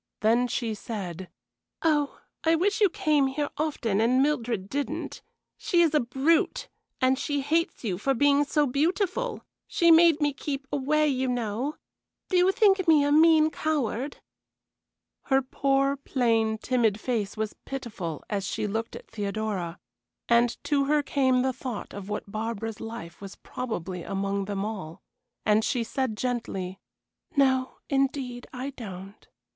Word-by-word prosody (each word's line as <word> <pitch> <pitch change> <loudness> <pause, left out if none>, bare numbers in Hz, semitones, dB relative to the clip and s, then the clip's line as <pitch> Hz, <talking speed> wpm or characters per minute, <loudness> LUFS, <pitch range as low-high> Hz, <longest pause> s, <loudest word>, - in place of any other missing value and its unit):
Then 230 +3 +3
she 230 -2 -2
said: 190 -5 -6 0.5
"Oh, 295 -3 +1 0.2
I 325 0 +4
wish 400 +6 +1
you 410 - +6
came 300 -4 +2
here 285 +2 -2
often 235 -9 0
and 255 +4 +4
Mildred 240 -9 -1
didn't. 280 +5 -4 0.4
She 345 -4 +3
is 320 -2 +2
a 300 - +5
brute, 270 +7 +1 0.3
and 260 0 +3
she 290 -1 -1
hates 325 +3 0
you 190 -6 -2
for 270 +5 +1
being 285 +2 +4
so 295 +1 +2
beautiful. 370 - 0 0.2
She 340 -1 +4
made 330 -1 +7
me 290 -1 +1
keep 275 0 -4
away, 300 +2 +2
you 260 -2 0
know. 245 +4 -2 0.5
Do 370 - +2
you 360 +1 +5
think 390 -3 +3
me 310 -3 +6
a 290 - +1
mean 315 0 +6
coward?" 285 -4 -2 1.1
Her 270 0 +4
poor, 275 +1 +1
plain, 230 -5 +1
timid 225 -3 +1
face 220 -4 -2
was 215 -1 -2
pitiful 210 - -5
as 200 -2 -2
she 210 - -2
looked 225 +2 -3
at - - -10
Theodora, 205 -5 -3 0.5
and 235 0 +3
to 280 -2 +1
her 295 +1 +2
came 260 -3 +2
the 260 0 +1
thought 250 -4 -6
of 200 0 -7
what 210 -1 -4
Barbara's 225 0 -4
life 225 -7 -8
was 195 -1 -8
probably 185 -7 -5
among 195 +1 -2
them 200 0 -2
all, 190 -7 -6 0.4
and 215 +1 +4
she 245 0 0
said, 240 -2 -2
gently: 195 -7 -3 0.6
"No, 260 -2 +2
indeed, 270 -3 -1
I 265 +2 -5
don't. 195 -5 -9
255 Hz, 150 wpm, -27 LUFS, 215-290 Hz, 1.1 s, made